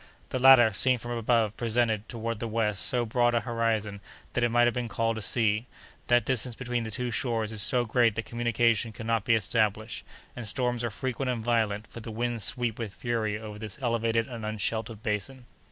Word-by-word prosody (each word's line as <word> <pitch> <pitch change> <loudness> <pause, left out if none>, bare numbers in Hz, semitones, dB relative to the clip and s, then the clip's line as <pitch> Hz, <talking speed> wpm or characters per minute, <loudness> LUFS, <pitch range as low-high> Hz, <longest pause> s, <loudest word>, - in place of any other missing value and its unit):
The 130 - -2
latter, 125 -4 +7
seen 130 +5 +4
from 120 +1 -7
above, 115 -2 +1
presented, 115 -2 0
toward 115 -2 -4
the 115 - -3
west, 105 -4 0
so 120 -1 +1
broad 120 +1 +2
an 115 - +1
horizon 110 -4 -1 0.3
that 125 - 0
it 120 - +3
might 120 +1 +4
have 120 - +2
been 125 -1 -2
called 115 +1 -1
a - - -7
sea; 110 +1 +1 0.4
the 120 0 +5
distance 125 -1 -1
between 120 0 -2
the 110 - -5
two 125 +2 -3
shores 115 -2 -1
is 110 -2 -2
so 125 +3 +2
great 115 -1 +2
that 115 - -3
communication 115 -1 +1
cannot 115 0 -2
be 115 - +4
established, 110 0 -1 0.3
and 120 -3 -6
storms 120 +2 -1
are 120 - 0
frequent 130 +4 -3
and 115 -3 -2
violent, 110 -3 +1
for 115 - -10
the 115 - -8
winds 115 0 -2
sweep 120 -2 -1
with 105 -5 -5
fury 110 -3 -1
over 105 -1 -8
this 110 -2 -6
elevated 115 -2 0
and 115 -3 -7
unsheltered 110 +1 -3
basin. 120 +4 -3
115 Hz, 200 wpm, -28 LUFS, 110-120 Hz, 0.4 s, latter